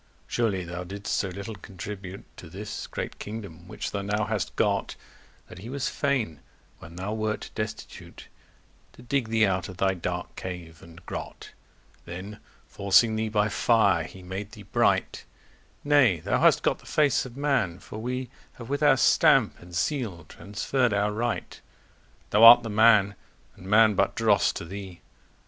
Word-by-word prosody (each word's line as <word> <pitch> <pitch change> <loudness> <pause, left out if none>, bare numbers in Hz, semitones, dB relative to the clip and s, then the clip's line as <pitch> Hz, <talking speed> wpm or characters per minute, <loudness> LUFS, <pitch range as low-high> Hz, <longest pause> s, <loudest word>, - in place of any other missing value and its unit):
Surely 105 -6 -1
thou 85 +1 -6
didst 100 +3 -5
so 100 - 0
little 100 +4 -7
contribute 95 0 -8
To 85 - -11
this 100 +5 -7
great - - -6
kingdome, 100 -6 -8
which - - -5
thou 100 - -3
now 105 +1 -1
hast 105 -3 -3
got, - - 0 0.5
That - - -12
he 110 +5 -9
was 140 +1 -2
fain, 125 - -1 0.4
when 85 +1 -12
thou 95 +4 -4
wert 110 -1 -3
destitute, 110 0 -7 0.7
To - - -15
digge 125 0 -1
thee 110 -1 +3
out 95 -2 -1
of 90 - -10
thy 95 +1 +2
dark 90 - -5
cave 85 -3 -8
and 85 +1 -15
grot: - - -7 0.5
Then 95 +5 -8 0.3
forcing 105 +3 +3
thee 110 0 -1
by 105 -1 +2
fire 100 -7 +3
he 95 +3 -12
made 95 +3 -6
thee 105 -3 -11
bright: 100 - 0 0.6
Nay, 140 - +4
thou - - 0
hast - - +4
got - - +1
the - - -18
face 145 -4 +2
of 125 +1 -13
man; 135 -12 0
for 105 - -10
we 125 +2 -4 0.2
Have 115 -1 -11
with 140 +1 -2
our 145 -3 +5
stamp - - +4
and 85 0 -12
seel 100 - -2
transferr'd 115 - -1
our 105 +1 +1
right: 115 +2 -3 0.7
Thou 105 +2 +4
art 120 +1 +11
the 115 - -5
man, 105 -2 +5 0.4
and 95 - -13
man 105 +1 +5
but 100 - +1
drosse 110 -4 +3
to - - -6
thee. 95 -1 -9
105 Hz, 165 wpm, -26 LUFS, 95-115 Hz, 0.7 s, art